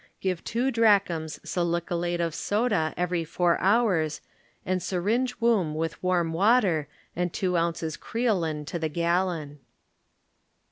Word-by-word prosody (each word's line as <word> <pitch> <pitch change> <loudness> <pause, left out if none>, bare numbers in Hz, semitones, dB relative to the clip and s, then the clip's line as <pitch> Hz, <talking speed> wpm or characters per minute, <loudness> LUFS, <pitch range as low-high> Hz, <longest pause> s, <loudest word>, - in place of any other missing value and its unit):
Give 185 -3 -2
two 245 +4 0
drachms 200 -9 +2
salicylate 175 0 -1
of 165 -2 -1
soda 205 -6 0
every 180 -1 0
four 170 +1 +1
hours 190 -7 +2 0.5
and 185 0 0
syringe 225 +9 -1
womb 210 -10 +2
with 160 +1 -3
warm 175 -3 +1
water 190 - +3 0.3
and 175 0 -1
two 180 0 -1
ounces 165 -2 -1
creolin 175 -11 -1
to 170 - -4
the 160 -1 -1
gallon. 170 -3 -1
175 Hz, 125 wpm, -26 LUFS, 165-200 Hz, 0.5 s, water